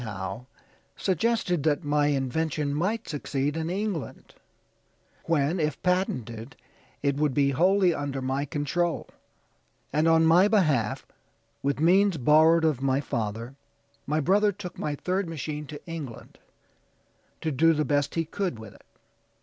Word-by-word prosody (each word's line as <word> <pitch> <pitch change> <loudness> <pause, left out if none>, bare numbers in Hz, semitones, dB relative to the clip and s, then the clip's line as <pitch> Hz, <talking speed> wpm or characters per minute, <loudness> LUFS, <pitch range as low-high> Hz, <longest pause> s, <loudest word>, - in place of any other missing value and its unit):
Howe, 105 +2 -6 0.5
suggested 190 -2 0
that 150 -1 +1
my 145 0 +2
invention 145 +1 -1
might 205 +9 -1
succeed 145 -1 -2
in 160 0 -2
England, 195 -4 -4 0.9
when, 165 +1 +1
if 150 -2 -1
patented, 125 - -1 0.5
it 140 -1 +1
would 145 -3 +1
be 140 -1 +3
wholly 180 +5 +3
under 145 -3 -3
my 135 +2 -1
control; 155 +4 -1 0.9
and 155 +2 +2
on 165 0 +5
my 175 +5 +6
behalf, 155 - +1 0.6
with 140 0 -1
means 185 +3 +4
borrowed 160 +4 +5
of 150 -5 +1
my 135 0 +1
father, 115 -2 -4 0.5
my 150 +2 +1
brother 200 +7 +3
took 190 -2 -9
my 150 - -2
third 185 +3 -2
machine 150 -1 -5
to 145 0 -8
England, 155 -8 -8 1.0
to 160 - -1
do 165 +4 +4
the 150 -1 0
best 145 -1 0
he 165 -1 0
could 180 - -3
with 110 -3 -11
it. - - -20
150 Hz, 140 wpm, -26 LUFS, 140-175 Hz, 1.0 s, my